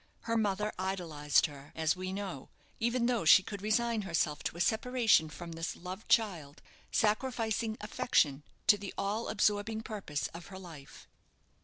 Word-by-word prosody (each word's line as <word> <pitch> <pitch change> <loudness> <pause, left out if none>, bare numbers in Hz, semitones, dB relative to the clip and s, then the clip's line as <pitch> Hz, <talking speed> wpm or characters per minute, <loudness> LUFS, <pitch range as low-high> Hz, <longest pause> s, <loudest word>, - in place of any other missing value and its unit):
Her 230 - -2
mother 210 -1 0
idolized 170 -6 +1
her, 145 -2 -9
as 160 +1 +1
we 185 0 -4
know, 190 -8 -5 0.3
even 235 +1 +1
though 240 -4 +1
she 185 +4 +8
could 200 0 -7
resign 225 +2 +1
herself 165 -5 -1
to - - -2
a - - -8
separation 220 -3 +3
from 170 +2 -8
this 165 0 -4
loved 185 +4 -8
child, 170 -10 +1 0.3
sacrificing 220 0 0
affection 210 - +1 0.2
to 205 - +6
the 200 -1 -7
all 210 +4 -1
absorbing 210 +1 +1
purpose 190 - -4
of 170 0 -10
her 190 - -9
life. 165 -7 -12
195 Hz, 155 wpm, -32 LUFS, 165-220 Hz, 0.3 s, she